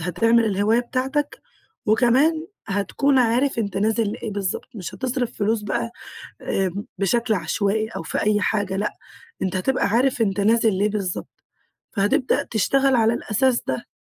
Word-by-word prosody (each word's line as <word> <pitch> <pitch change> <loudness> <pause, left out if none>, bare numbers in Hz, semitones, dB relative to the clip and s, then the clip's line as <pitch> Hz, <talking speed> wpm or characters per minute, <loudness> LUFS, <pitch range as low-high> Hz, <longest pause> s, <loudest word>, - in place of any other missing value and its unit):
هتعمل 230 +7 +2
الهواية 210 +3 +2
بتاعتك، 265 +4 -2 0.5
وكمان 265 +9 +3 0.2
هتكون 255 +8 +1
عارف 245 +2 +2
أنت 200 -4 -2
نازل 215 +1 +1
لإيه 220 - -5
بالضبط، 195 -2 -3
مش 185 -5 -6
هتصرف 250 -2 -2
فلوس 215 +1 0
بقى 210 +3 -2 0.5
آمم، 195 +2 -1
بشكل 225 +3 +1
عشوائي 200 +5 0
أو 225 - -6
في - - -2
أي 210 0 +2
حاجة، 200 -1 0
لأ، 205 +2 -1 0.5
أنت 190 0 -1
هتبقى 225 +5 +1
عارف 245 +3 +2
أنت 195 -2 +1
نازل 220 +1 +3
ليه 200 +3 +1
بالضبط، 200 -4 -4 0.5
فهتبدأ 205 +5 +1
تشتغل 270 +5 +2
على 225 0 +3
الأساس 240 +3 +1
ده. - - -2
220 Hz, 145 wpm, -22 LUFS, 200-245 Hz, 0.5 s, وكمان